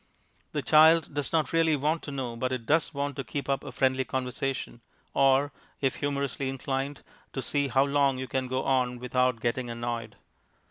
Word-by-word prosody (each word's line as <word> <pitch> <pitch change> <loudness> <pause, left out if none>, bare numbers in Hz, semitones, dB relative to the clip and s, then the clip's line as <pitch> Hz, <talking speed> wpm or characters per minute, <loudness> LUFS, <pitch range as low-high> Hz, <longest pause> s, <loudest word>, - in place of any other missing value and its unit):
The - - -1
child 160 0 +6
does 145 -1 -2
not 160 -3 +1
really 165 -1 +4
want 150 +4 0
to 145 - -7
know, 130 -4 -4
but 130 +2 -2
it 125 -3 -3
does 155 +5 +2
want 140 -2 -3
to 135 - -2
keep 140 +4 -5
up 135 -1 0
a 140 - -7
friendly 130 +1 +1
conversation, 130 -1 -3 0.3
or, 135 +1 +4 0.3
if 135 -2 0
humourously 140 -2 -2
inclined, 135 +1 -3 0.3
to 135 - -2
see 140 +2 0
how 135 +1 +3
long 140 -1 +2
you 130 0 -4
can 130 0 -1
go 130 +1 -1
on 125 -2 +1
without 125 0 +1
getting 120 +1 -1
annoyed. 115 -2 -4
135 Hz, 185 wpm, -28 LUFS, 125-145 Hz, 0.3 s, child